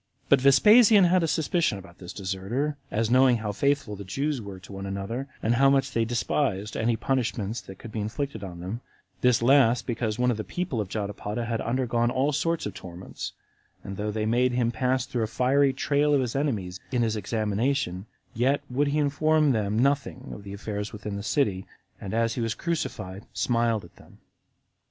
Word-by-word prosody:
But 140 -2 +5
Vespasian 210 - +7
had 180 +1 +4
a 165 - +1
suspicion 160 - +1
about 95 -2 -13
this 90 -1 -8
deserter, 100 +10 -2
as 110 +2 0
knowing 130 -1 +5
how 110 -2 -3
faithful 140 0 0
the 100 - -8
Jews 135 +7 -2
were 100 -3 -8
to 95 - -12
one 95 0 -6
another, 100 +7 -4 0.2
and 115 - +2
how 135 +3 +5
much 135 -1 +2
they 115 -1 +1
despised 115 -3 -1
any 115 +1 +1
punishments 115 -3 -1
that 95 - -11
could 115 - -10
be 110 - -4
inflicted 110 +1 -4
on 85 -3 -7
them; 100 +7 -5 0.4
this 125 -2 +3
last 125 -2 +4
because 115 -3 -2
one 125 0 +2
of 115 - -2
the 110 - -3
people 175 -9 -3
of 100 - -5
Jotapata 105 +2 -3
had 115 -1 -2
undergone 120 -1 0
all 130 +4 +1
sorts 165 +3 0
of 105 - -4
torments, 90 0 -8 0.5
and 100 - -6
though 105 +2 -3
they 110 0 -2
made 120 +3 +2
him 120 -1 +1
pass 130 +1 0
through 125 -2 -3
a 110 - 0
fiery 135 +4 +3
trial 145 +2 +2
of 140 - +3
his 125 -1 -3
enemies 105 -11 -1
in 125 -2 +1
his 110 -1 0
examination, 110 -1 -1 0.3
yet 130 +5 +1
would 140 +4 +1
he 145 +2 0
inform 150 +1 +3
them 105 -3 0
nothing 135 0 0
of 105 - -9
the 100 0 -8
affairs 105 0 -4
within 105 -1 -6
the 100 - -4
city, 100 -5 0 0.3
and 100 +2 -4
as 115 0 +1
he 120 - -3
was 115 -1 -1
crucified, 100 - -4
smiled 115 -4 +1
at - - -18
them. - - -18
115 Hz, 200 wpm, -26 LUFS, 105-135 Hz, 0.5 s, Vespasian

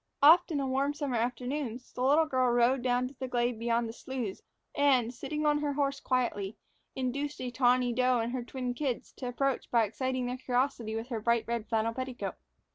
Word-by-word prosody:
Often 315 0 +7
on 265 -1 -1
warm 280 +2 +1
summer 280 -5 -1
afternoons, 250 +1 -3
the - - -5
little 290 +5 +5
girl 255 -4 +1
rode 240 +2 +3
down 250 0 +1
to 260 - -11
the 260 - -3
glade 240 -2 0
beyond 235 0 +1
the 225 - -6
sloughs 240 -5 -5 0.3
and, 260 -5 +3
sitting 300 +5 -4
her 295 -1 +2
horse 275 -1 0
quietly, 220 -5 -1 0.4
induced 280 +3 -2
a 250 -1 -3
tawny 245 0 +3
doe 250 +1 +3
and 230 0 -1
her 255 - -1
twin 250 0 -4
kids 255 -2 -3
to 255 - -4
approach 265 +1 -1
by 235 -2 +4
exciting 255 +4 -2
their 250 +1 -3
curiosity 250 -3 -1
with 225 +3 -4
her 230 -3 -2
bright 235 +1 +1
red 235 -2 -2
flannel 225 0 0
petticoat. 255 0 -4
250 Hz, 195 wpm, -30 LUFS, 235-270 Hz, 0.4 s, Often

